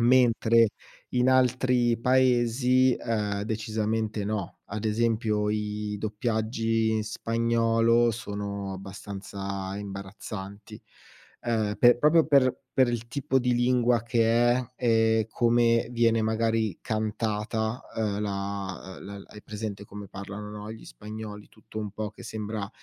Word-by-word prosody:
Mentre 115 -2 +5 0.4
in 125 +1 +2
altri 125 -2 +3
paesi, 125 0 +3
ehm, 105 -3 -2
decisamente 110 0 -2
no. 105 -2 -3 0.2
Ad 105 +2 -4
esempio 110 -1 +1
i 105 0 -2
doppiaggi 110 +1 0
in 110 -1 +1
spagnolo 115 +1 +2
sono 100 -3 -4
abbastanza 95 0 -6
imbarazzanti. 100 0 -8 0.6
Ehm, 110 -3 0
pe 120 0 +7
proprio 155 +4 +5
per 135 -4 +4 0.2
per 130 - +7
il 120 -1 -3
tipo 135 +1 0
di 125 0 +1
lingua 120 -1 +3
che 115 -1 +2 0.3
è, 125 0 -3
e 115 -2 +3
come 115 0 +3
viene 115 -2 +2
magari 110 -2 0
cantata, 110 +1 -2
ehm, 105 -2 -1
la 100 -2 -4
uhm, 100 0 -8
l - - -13
hai 105 - -12
presente 105 -1 -6
come 100 0 -9
parlano 100 +2 -7
no, 105 0 -7
gli 110 - -11
spagnoli, 105 - -8
tutto 110 0 -10
un 105 -2 -4
po' 105 +1 -4
che 110 - -14
sembra 105 -2 -4
110 Hz, 125 wpm, -27 LUFS, 105-120 Hz, 0.6 s, pe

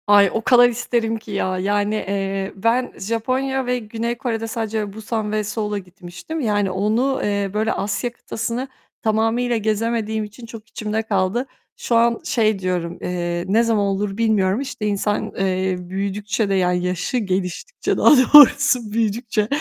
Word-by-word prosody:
Ay, 205 -1 +6
o 225 - 0
kadar 245 +1 +6
isterim 230 -1 -1
ki 220 -1 -11
ya 185 -2 -1
yani, 205 +2 0
eee, 195 -1 -2
ben 230 +5 +1
Japonya 255 +5 -1
ve 250 0 0
Güney 230 +1 -3
Kore'de 225 -3 -3
sadece 220 -3 -3
Busan 220 0 -3
ve 215 0 0
Seul'a 210 0 -3
gitmiştim, 185 - -8
yani 205 -6 0
onu, 220 +8 0
eee, 200 -1 -1
böyle 220 +1 0
Asya 210 +4 -2
kıtasını 235 +2 -4 0.3
tamamıyla 225 +2 +1
gezemediğim 220 0 -1
için 210 +3 -10
çok 225 -1 -11
içimde 215 -1 -3
kaldı. 205 +3 0 0.3
Şu 235 - -1
an 235 0 +3
şey 215 -4 +1
diyorum. 180 -2 -2
Eee, 175 -1 -2
ne 220 +5 +3
zaman 220 -3 +1
olur 195 0 -2
bilmiyorum. 215 -1 +2
İşte 260 -5 -5
insan, 205 0 -1
eee, 190 -1 0
büyüdükçe 200 +3 -2
de - - +1
yani 180 -1 +1
yaşı 180 +7 -1
geliştikçe, 190 - -2
daha - - +5 0.2
doğrusu 280 -5 +7
büyüdükçe, 220 -1 0
215 Hz, 155 wpm, -21 LUFS, 195-230 Hz, 0.3 s, doğrusu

